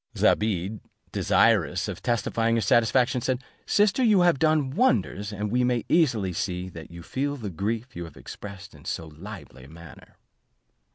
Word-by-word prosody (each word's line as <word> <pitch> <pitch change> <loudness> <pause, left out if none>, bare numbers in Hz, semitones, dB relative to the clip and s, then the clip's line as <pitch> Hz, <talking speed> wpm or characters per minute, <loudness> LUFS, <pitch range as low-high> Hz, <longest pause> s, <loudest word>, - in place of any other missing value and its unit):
Zobeide, 105 -1 +1 0.3
desirous - - +2
of - - -6
testifying 115 -1 0
her 115 - +1
satisfaction, 120 +5 +3
said, 130 +1 -1 0.2
"Sister, 205 +5 +3
you 210 -5 +5
have 175 -5 +4
done 155 -4 +2
wonders, 105 - +1
and 105 0 -3
we 125 +1 +2
may 125 -2 0
easily 115 - +2
see 90 +1 -3
that 85 -3 -10
you 85 0 -10
feel 140 - -2
the 105 -6 -5
grief 110 +8 -3
you 85 0 -5
have 80 - -13
expressed 100 -2 -9
in 75 -1 -16
so 80 - -4
lively 80 - -11
a - - -15
manner." 85 0 -14
110 Hz, 165 wpm, -26 LUFS, 90-130 Hz, 0.3 s, you